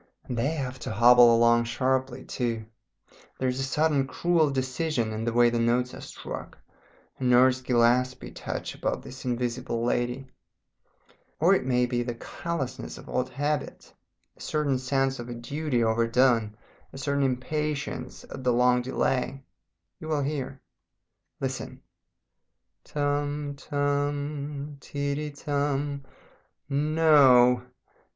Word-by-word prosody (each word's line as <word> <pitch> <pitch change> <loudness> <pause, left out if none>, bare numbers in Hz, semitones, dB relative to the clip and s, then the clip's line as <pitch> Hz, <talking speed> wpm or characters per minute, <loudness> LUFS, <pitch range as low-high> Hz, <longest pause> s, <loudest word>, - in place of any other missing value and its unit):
And 125 - -5
they 120 +4 +1
have 135 -4 -4
to - - -5
hobble 120 0 +7
along 120 0 +4
sharply 130 +1 -1
too; 115 -3 -2 0.7
there 130 - -1
is 125 +1 -1
a - - 0
certain 140 +1 +1
cruel 165 0 +2
decision 130 -2 -1
in 110 +1 -3
the 120 - 0
way 120 0 +4
the 120 - 0
notes 120 +2 +1
are - - -9
struck, - - -8 0.6
a - - -5
Nurse 125 +1 +5
Gillespie 125 +1 +2
touch - - -5
about - - -3
this 130 +1 -10
Invisible 120 -1 -2
Lady. 125 +2 -1 1.1
Or 175 +5 +5
it 130 -9 0
may 125 -1 +3
be 120 0 -1
the 120 -1 -3
callousness 155 +2 -5
of - - -12
old 125 0 -1
habit, 145 +1 -3 0.4
a - - -19
certain 145 -4 0
sense 135 0 0
of 120 0 -7
a 120 - -5
duty 130 +1 -1
overdone, 115 -1 +2 0.3
a - - -10
certain 140 +1 -1
impatience 140 +3 -2
at 130 - -9
the 125 - +3
long 125 +1 +4
delay. 130 +1 -1 0.6
You 155 - -8
will 150 -3 0
hear. 135 -2 -4 0.8
"Listen! - - -4 1.1
Tum 145 0 -1
Tum 145 0 -2
Ti 140 0 -3
ti 150 +1 -3
tum 145 -1 -2 0.7
No! 140 -5 +5
130 Hz, 130 wpm, -27 LUFS, 120-145 Hz, 1.1 s, hobble